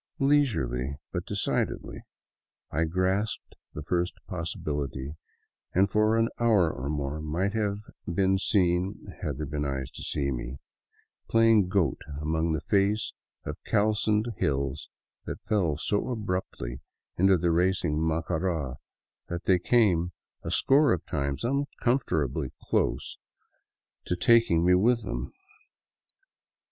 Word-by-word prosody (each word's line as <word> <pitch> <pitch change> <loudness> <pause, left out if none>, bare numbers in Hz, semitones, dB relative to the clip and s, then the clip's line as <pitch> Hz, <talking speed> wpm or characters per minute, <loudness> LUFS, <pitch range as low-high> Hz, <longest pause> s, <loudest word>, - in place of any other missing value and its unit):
Leisurely, 80 - +1 0.2
but - - -3
de - - -4
cidedly, - - -1 0.7
I 80 +3 +1
grasped 95 +6 -1 0.2
the 75 - -5
first 90 +3 0
possibility, 70 -1 -3 0.6
and 95 +2 +4
for 110 +2 +3
an 115 0 +3
hour 105 -8 +4
or 65 +3 -4
more 75 0 -2
might 85 +6 -1
have 105 -2 0 0.3
been 95 +2 +2
seen 95 0 +2 0.2
— - - -21
had 70 -4 -3
there 75 - -3
been 75 +1 -3
eyes 65 -2 -3
to - - -10
see 65 -3 -2 0.3
— - - -40
playing 115 -4 +5
goat 90 -8 +1 0.2
along 80 +2 0
the 80 - -1
face 100 +2 +1 0.3
of - - -6
calcined 110 +1 +2
hills 70 0 -1 0.4
that - - -6
fell 90 -9 +1
so 105 +9 0
abruptly 90 - -3 0.4
into 95 +1 +5
the 85 0 +1
racing 85 -3 +1
Macara 80 -3 -1 0.5
that 85 0 -4
they 95 -2 +4
came 90 -5 +3 0.3
a - - -5
score 140 -1 +5
of 85 - -3
times 70 +1 -2
uncomfortably 120 - 0 0.2
near 90 - -4
taking 115 -9 +4
me 90 - +5
with 115 +5 +3
them. - - -4
90 Hz, 125 wpm, -28 LUFS, 75-105 Hz, 0.7 s, playing